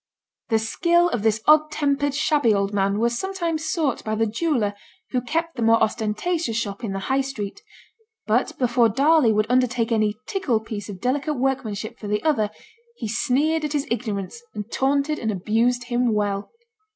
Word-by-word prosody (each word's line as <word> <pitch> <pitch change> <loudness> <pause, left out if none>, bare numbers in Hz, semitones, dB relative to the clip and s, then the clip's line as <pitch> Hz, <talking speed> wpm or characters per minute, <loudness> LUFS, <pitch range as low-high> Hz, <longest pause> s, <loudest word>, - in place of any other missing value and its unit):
The 225 - +3
skill 345 +10 +2
of 240 - -2
this 220 0 +1
odd 305 0 +5
tempered, 285 -2 0
shabby 290 -7 +3
old 200 +1 -1
man 200 0 +1
was 235 +2 +1
sometimes 340 -5 -2
sought 310 -6 0
by 215 0 -2
the 225 +1 +2
jeweller 225 -2 0 0.4
who 250 - 0
kept 330 +6 -2
the 240 - -5
more 225 0 +5
ostentatious 225 +6 -1
shop 205 -1 -3
in 205 -4 -3
the 195 - -3
High 270 +1 +2
Street; 265 - -5 0.6
but 225 +4 0
before 240 -2 +3
Darley 275 +2 +4
would 215 0 +2
undertake 250 -1 +1
any 215 -2 +2
'tickle' 285 - 0
piece 215 -2 -6
of 195 -2 -7
delicate 280 +4 0
workmanship 240 -4 -2
for 210 - -7
the 210 0 -1
other, 245 -10 +2 0.5
he 225 - -5
sneered 295 +8 +1
at 300 0 -2
his 290 -1 0
ignorance, 215 - -3
and 210 +2 -6
taunted 280 +3 +1
and 220 - -2
abused 225 +5 +1
him 240 -2 0
well. 205 -1 -1
240 Hz, 175 wpm, -23 LUFS, 215-290 Hz, 0.6 s, odd